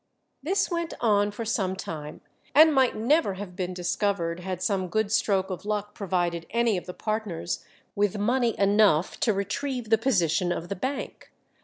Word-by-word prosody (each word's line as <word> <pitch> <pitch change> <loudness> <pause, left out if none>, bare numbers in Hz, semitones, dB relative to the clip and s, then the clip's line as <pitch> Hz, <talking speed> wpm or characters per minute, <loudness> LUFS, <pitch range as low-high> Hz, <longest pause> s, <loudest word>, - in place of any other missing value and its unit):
This 390 +7 0
went 340 -1 -2
on 205 -3 +3
for 215 +3 -6
some 195 -4 0
time, 155 -5 -7 0.3
and 310 +1 +8
might 265 -3 +3
never 235 - +2
have 190 -2 -8
been 185 -1 -3
discovered 180 -1 -1
had 185 0 -4
some 190 -3 0
good 215 +3 0
stroke 200 -4 +1
of 180 -1 -5
luck 210 0 -3
provided 175 -4 -2
any 235 -2 +2
of 180 - -5
the 180 - -5
partners 215 -6 -3 0.3
with 205 0 0
money 235 +3 +1
enough 200 -5 +3
to 225 - +3
retrieve 225 +4 -3
the 225 - +5
position 180 - +1
of 175 0 -4
the 200 - -2
bank. 260 +9 -5
205 Hz, 170 wpm, -26 LUFS, 180-230 Hz, 0.3 s, and